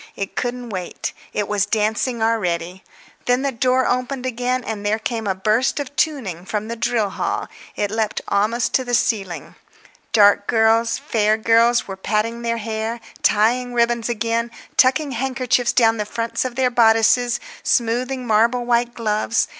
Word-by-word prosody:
It 195 - -5
couldn't 245 0 -3
wait; 185 -3 -5 0.2
it 205 - -2
was 205 -1 0
dancing 220 +2 0
already. 180 -5 -1 0.4
When 245 +2 +2
the 275 - 0
door 255 +1 +1
opened 255 +1 -1
again 250 0 -1
and 210 -2 -5
there 210 +1 +1
came 225 -1 -3
a 190 - 0
burst 215 +8 +1
of 285 0 -6
tuning 225 - -1
from 210 +2 -3
the 235 - -3
drill 225 -3 0
hall, - - -2 0.3
it 205 -1 -1
leaped 220 -1 -1
almost 215 +4 0
to 260 - +2
the 245 -1 0
ceiling. 195 -7 -1 0.6
Dark 205 -2 +5
girls, 225 0 +3
fair 215 -1 +1
girls 230 +2 +3
were 195 - -5
patting 220 +4 -1
their 230 0 -1
hair, 225 +1 -3 0.2
tying 245 +4 +2
ribbons 235 0 +1
again, 230 +1 -1 0.3
tucking 270 +3 +3
handkerchiefs 255 -1 0
down 225 -2 +3
the 210 - -2
fronts 230 +2 -2
of 250 -2 -4
their 255 -1 +1
bodices, 230 +1 +3 0.2
smoothing 250 +2 0
marble 235 +2 +2
white 240 0 +1
gloves. 215 +1 0
230 Hz, 160 wpm, -20 LUFS, 215-245 Hz, 0.6 s, Dark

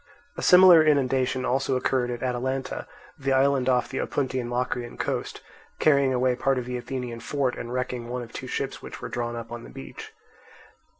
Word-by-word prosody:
A - - -5
similar 180 -3 +8
inundation 130 -3 +2
also 130 +1 +1
occurred 125 -1 0
at 120 0 -4
Atalanta, 130 +1 -2 0.3
the 135 -1 0
island 135 -1 +3
off 125 -1 +2
the 135 - -4
Opuntian 130 -3 -2
Locrian 120 -1 -3
coast, - - -3 0.4
carrying 140 -3 +4
away 125 0 +2
part 135 +1 +1
of 125 - -2
the 125 0 -4
Athenian 125 -2 -5
fort 135 -1 -1
and 120 - -6
wrecking 125 -1 -3
one 125 0 -3
of 115 - -12
two - - -6
ships - - -3
which - - -9
were - - -6
drawn 120 -1 -3
up 115 0 -7
on 120 0 -6
the - - -11
beach. 65 +1 -10
125 Hz, 185 wpm, -26 LUFS, 120-135 Hz, 0.4 s, similar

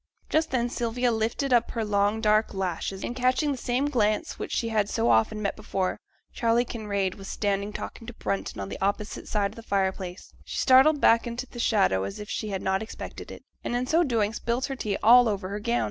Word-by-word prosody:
Just 315 +1 +2
then 240 -2 0
Sylvia 240 +1 0
lifted 230 +4 0
up 240 -1 +3
her 225 -2 -2
long, 205 +1 +1
dark 215 -1 +2
lashes, 190 +1 -3
and 240 - -4
catching 255 +4 +2
the 275 - -2
same 250 +4 0
glance 215 -6 0
which - - -5
she 230 - -1
had 210 -2 +1
so 115 +1 +2
often 115 - +2
met 200 - -1
before 185 -1 -2 0.3
Charley 235 0 +2
Kinraid 200 -5 -2
was 195 - -9
standing 200 0 -1
talking 225 +2 -7
to 245 - -7
Brunton 100 - -3
on 95 0 -4
the - - -7
opposite 200 +2 -2
side 200 -2 0
of - - -15
the 230 - -9
fire 195 -3 +1
place 185 -1 -9
she - - -6
started 275 +3 +6
back 230 -3 +4
into 240 +2 -4
the 240 - -11
shadow 195 - +2
as 100 0 -5
if 210 0 -7
she 215 - -3
had 195 -2 -3
not 190 0 +1
expected 220 - -8
it, - - -10 0.2
and 240 - -2
in 245 +1 0
so 320 +6 +3
doing 225 -7 0
spilt 240 +3 -1
her 270 - -4
tea 210 -6 -2
all 240 +1 +7
over 195 -2 -3
her 205 +1 -4
gown. 235 +3 0
220 Hz, 225 wpm, -26 LUFS, 200-240 Hz, 0.3 s, all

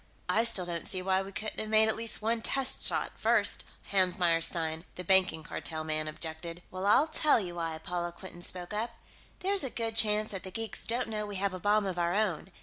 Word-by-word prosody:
"I 225 +2 +2
still 205 -6 +3
don't 170 -2 -4
see 185 -1 -2
why 190 0 +2
we 195 0 -8
couldn't 215 +3 -4
have 215 - -3
made 220 0 +5
at 220 - +2
least 225 -1 -1
one 225 +1 0
test 270 +3 +2
shot, - - +4
first," - - +1 0.3
Hans 185 -2 +3
Meyerstein, 165 -2 0
the 180 - -6
Banking 185 -3 +2
Cartel 155 +1 -3
man, 155 0 -2
objected. 160 +2 -6
"Well, 185 +2 -3
I'll 270 +8 +5
tell 310 -4 +3
you 180 -4 -5
why," 165 -2 -3
Paula 175 +1 -4
Quinton 175 0 -12
spoke 180 +2 -3
up. 230 +2 -3 0.5
"There's 390 0 +3
a 265 - -1
good 225 -1 -3
chance 215 -1 +4
that 195 -2 -5
the 190 - -7
geeks 225 +4 -4
don't 240 +2 0
know 210 -1 -4
we 205 - -6
have 195 0 -1
a 185 - -5
bomb 205 +2 +2
of 185 -2 -3
our 170 +1 0
own. 195 -4 -1
190 Hz, 225 wpm, -30 LUFS, 175-220 Hz, 0.5 s, made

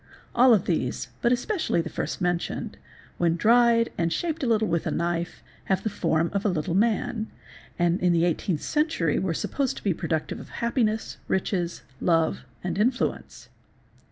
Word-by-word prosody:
All 250 +1 +6
of 190 - -1
these, 130 -8 -1
but 235 - +3
especially 260 - 0
the 165 - -1
first - - -4
mentioned, 175 -1 -2 0.4
when 170 -1 +3
dried 230 +4 +4
and 170 0 +1
shaped 325 - -2
a 265 - 0
little 220 -2 +2
with 170 -2 0
a - - +1
knife, 170 0 -2 0.2
have 190 - 0
the 220 - -1
form 165 -3 0
of 200 0 0
a 210 - +2
little 165 -2 -1
man, 220 +2 +1 0.5
and 175 0 +2
in 180 0 +3
the 170 -1 +3
18th 175 -1 0
century 300 - +1
were 175 -4 -1
supposed 275 - -1
to - - -9
be 200 - +2
productive 160 0 -2
of - - -11
happiness, 230 -2 -1
riches, 180 -2 -1
| 130 - -28
love, 165 -2 +1 0.2
and 185 +2 -2
influence. 245 +4 -1
185 Hz, 175 wpm, -26 LUFS, 170-235 Hz, 0.5 s, All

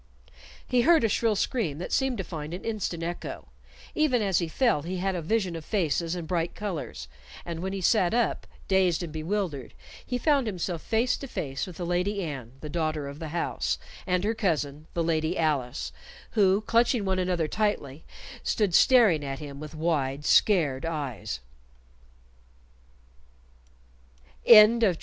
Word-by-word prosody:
He 250 -1 +3
heard 325 +2 +5
a - - +4
shrill 220 +1 +1
scream 195 - -1
that 175 - -6
seemed 265 -3 +1
to 190 - -2
find 160 -1 -6
an 180 - -9
instant 205 -7 -3
echo; 175 +1 -6 0.4
even 300 -6 +2
as 195 -3 +2
he 170 - -1
fell 230 - +1
he 180 +4 -4
had 190 +1 -1
a 175 - -3
vision 185 0 0
of 165 - -6
faces 170 -3 0
and 170 -3 -5
bright 170 0 -1
colors, 170 - -5 0.4
and 170 -1 -5
when 190 +2 -3
he 195 -1 -4
sat 185 -1 +3
up, 240 0 0 0.2
dazed 185 -3 +2
and 160 -3 -6
bewildered, 160 - -3 0.3
he 250 - -2
found 280 -2 +2
himself 180 -4 -3
face 230 +3 +1
to 275 - -7
face 135 - -4
with 180 - -10
the 175 - -4
Lady 185 +3 0
Anne, 135 -7 -6
the 155 - -6
daughter 155 -2 -2
of 140 +1 -8
the 160 - -5
house, 155 - -1 0.3
and 180 0 +1
her 215 +2 +1
cousin, 155 -8 -2
the 170 - +1
Lady 160 +1 0
Alice, 145 -5 -1 0.4
who 200 -2 +3
clutching 230 0 +2
one 190 -1 0
another 180 -3 0
tightly, 160 -8 -2 0.4
stood 205 -5 0
staring 215 - +5
at 135 -1 -4
him 140 -1 -8
with 155 +1 -8
wide 150 -3 -1
scared 155 -12 +3
eyes. 140 - -4
175 Hz, 160 wpm, -27 LUFS, 155-210 Hz, 0.4 s, heard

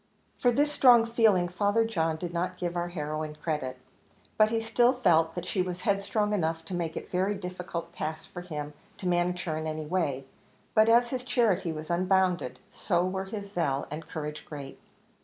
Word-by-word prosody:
For 245 - +4
this 290 +4 +2
strong 245 -5 +6
feeling 220 -6 +3
Father 205 +5 +1
John 165 -8 0
did 175 +1 -5
not 180 +1 -2
give 175 -1 -3
our 175 0 -1
heroine 155 -2 -4
credit; 150 -5 -3 0.6
but 215 0 +5
he 225 0 +1
still 240 +2 +3
felt 165 -9 +3
that 175 -1 -4
she 185 +1 0
was 180 -1 -3
headstrong 210 0 +1
enough 165 -4 -1
to 190 - -7
make 170 -2 -2
it - - -5
a - - -23
very 190 +3 +1
difficult 180 -3 -6
task 155 0 -5
for 175 - -6
him 150 -4 -6 0.2
to 185 - -4
manage 175 0 +1
her 160 -3 -2
in 160 0 -3
any 155 0 -3
way. 150 -6 -1 0.5
But 220 0 +5
as 240 +1 +5
his 255 -1 -3
charity 225 -9 +1
was 155 +1 -6
unbounded, 185 0 +1 0.2
so 175 -2 +1
were 190 +1 -2
his 200 0 -6
zeal 140 -7 0
and 155 +1 -6
courage 150 -1 -5
great. 140 -3 -8
180 Hz, 195 wpm, -28 LUFS, 160-205 Hz, 0.6 s, strong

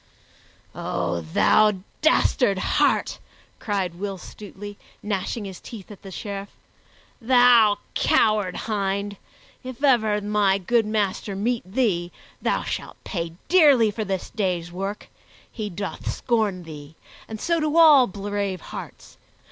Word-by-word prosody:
"O 85 -1 -2
thou 210 - +3 0.3
dastard 255 - +3
heart!" - - +1 0.4
cried 195 -5 -2
Will 195 +2 -5
Stutely, 205 +1 -10 0.2
gnashing 205 +1 -3
his 190 -3 -8
teeth 215 -4 -10
at 205 - -12
the 195 - -10
Sheriff. 200 +3 -6 0.7
"Thou 240 -3 +5 0.2
coward 210 -4 +2
hind! 200 -1 -2 0.5
If 255 +1 -8
ever 220 -6 +3
my 205 -1 +2
good 220 +3 +1
master 205 -2 -1
meet 215 -2 -2
thee 190 -7 0 0.3
thou - - 0
shalt - - -5
pay 170 -4 -4
dearly 285 - +5
for 215 +2 -3
this 190 -2 -4
day's 180 -5 -2
work! 195 +3 -5 0.4
He 215 -3 -5
doth 200 +2 -5
scorn 215 -6 -1
thee, 150 -1 -11 0.3
and 220 -1 -7
so 335 +5 0
do 310 +1 0
all 300 -6 +8
brave 200 -1 -3
hearts. - - -9
205 Hz, 125 wpm, -24 LUFS, 190-225 Hz, 0.7 s, all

